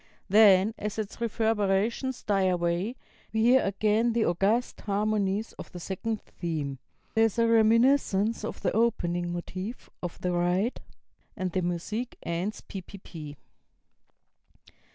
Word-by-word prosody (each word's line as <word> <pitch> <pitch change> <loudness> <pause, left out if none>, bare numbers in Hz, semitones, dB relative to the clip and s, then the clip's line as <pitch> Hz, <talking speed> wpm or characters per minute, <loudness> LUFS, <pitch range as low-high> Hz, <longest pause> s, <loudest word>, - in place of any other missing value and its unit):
Then, 205 0 +6
as 210 0 -4
its 215 +1 -5
reverberations 225 +2 0
die 195 -2 +2
away, 180 +5 0 0.4
we 220 0 +1
hear 250 +3 +6
again 215 +4 +1
the 230 -1 +2
august 200 +8 +1
harmonies 205 0 0
of - - -8
the 180 - -8
second 205 +5 -3
theme; 150 -6 -4 0.3
there 225 0 +4
is 225 - -1
a 230 0 +4
reminiscence 230 -1 +3
of - - -5
the 185 - +2
opening 175 -6 0
motive 185 +6 -6
(of 175 -1 -5
the 180 - 0
ride), 180 +6 0 0.6
and 185 -1 -2
the 185 - 0
music 180 +8 -3
ends 175 +5 -3
ppp. 175 -6 -9
205 Hz, 130 wpm, -28 LUFS, 180-225 Hz, 0.6 s, Then